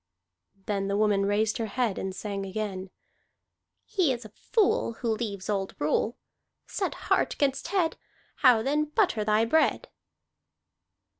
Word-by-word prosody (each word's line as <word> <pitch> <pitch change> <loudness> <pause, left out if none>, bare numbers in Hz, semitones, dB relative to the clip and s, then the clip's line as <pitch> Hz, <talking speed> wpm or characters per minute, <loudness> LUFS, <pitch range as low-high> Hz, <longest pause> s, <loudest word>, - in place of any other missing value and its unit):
Then 195 -2 -1
the 200 0 0
woman 205 -2 +2
raised 215 +2 +1
her 225 - -1
head 235 -3 -1
and 190 -1 -4
sang 200 0 -4
again: 195 -1 -4 1.0
"He 370 -10 +1
is 240 -2 -4
a - - -9
fool 380 - +1
Who 230 0 -2
leaves 205 -4 -4
old 195 -2 -2
rule. 155 +10 0 0.5
Set - - -3
heart - - +2
'gainst 275 +1 0
head. 345 -3 0 0.4
How 245 -5 +5
then 295 +4 +1
butter 300 - +1
thy 215 +1 +3
bread?" 315 +7 +2
220 Hz, 140 wpm, -27 LUFS, 200-265 Hz, 1.0 s, How